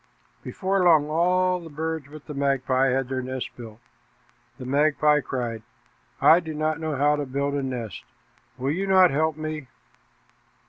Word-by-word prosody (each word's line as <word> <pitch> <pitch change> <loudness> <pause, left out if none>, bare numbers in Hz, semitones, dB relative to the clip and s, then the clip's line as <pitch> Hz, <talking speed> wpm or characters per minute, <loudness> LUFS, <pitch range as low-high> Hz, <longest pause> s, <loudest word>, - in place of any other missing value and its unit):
Before 190 0 -1
long 155 -4 +4
all 180 +2 +2
the 165 -2 -10
birds 160 -1 -4
but 155 -1 -11
the 150 - -7
magpie 135 -1 +1
had 130 0 0
their 130 0 -3
nests 130 0 -5
built. 115 -2 -11 0.8
The 130 - -8
magpie 150 +2 +3
cried, 120 -4 -4 0.6
"I 165 - +6
do 160 -3 -7
not 155 +1 -1
know 155 -2 -3
how 145 +2 +2
to 145 - -2
build 140 +2 -2
a 145 - -1
nest. 125 -6 -5 0.5
Will 130 +2 -1
you 190 +5 -2
not 185 -2 +6
help 155 +2 0
me?" 155 -3 -5
150 Hz, 165 wpm, -24 LUFS, 130-160 Hz, 0.8 s, I